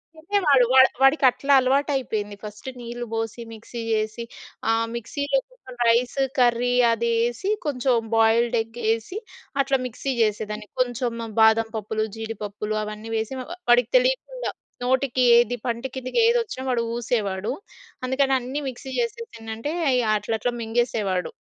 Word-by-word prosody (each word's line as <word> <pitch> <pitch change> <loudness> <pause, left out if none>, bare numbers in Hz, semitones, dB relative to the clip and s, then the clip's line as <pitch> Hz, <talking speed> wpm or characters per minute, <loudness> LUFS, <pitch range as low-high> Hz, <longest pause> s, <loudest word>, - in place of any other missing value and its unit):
తినేవాడు. 315 -6 +3
వాడు 260 0 +8
వాడికట్లా 270 0 +4
అలవాటైపోయింది. 255 -6 0
ఫస్ట్ 210 +3 -9
నీళ్ళు 240 0 -6
పోసి 225 +1 -3
మిక్సీ 225 +2 -9
చేసి 215 +1 -1 0.5
ఆహ్, 225 0 +2
మిక్సీలో 285 - -1 0.5
రైస్ 240 +3 +2 0.2
కర్రీ 245 -1 +3 0.2
అదేసి 235 - 0 0.2
కొంచెం 260 -3 +1 0.2
బాయిల్డ్ 225 +2 +3
ఎగ్ 225 +1 -10 0.2
ఏసి 230 - -6 0.4
అట్లా 275 0 +1
మిక్సీ 250 +3 -3
చేసేదాన్ని. 210 0 -1
కొంచెం 240 -2 -1
బాదం 220 0 +5
పప్పులు, 215 +1 -2
జీడిపప్పులు 215 -1 -4
అవన్నీ 215 +1 -7
ఏసి 225 +4 -6
వ - - -5 0.3
వాడికి 245 +1 +5
తెలీకుండా - - -1 0.3
నోటికి 260 0 +1
ఏది 240 0 +3
పంటి 235 +2 -2
కిందకేదొచ్చినా 435 - +1
వాడు 245 -2 +1
ఊసేవాడు. 215 -3 -1 0.5
అందుకని 265 +1 +1
అన్నీ 255 +4 -4
మిక్సీ 260 +1 -9
చేసేసి 465 -1 -3
ఏంటంటే 225 +5 -5 0.5
అట్లా 210 +2 -4
అట్లా 245 +3 -1
మింగేసేవాడు. 220 -6 -1
240 Hz, 125 wpm, -24 LUFS, 225-265 Hz, 0.5 s, వాడు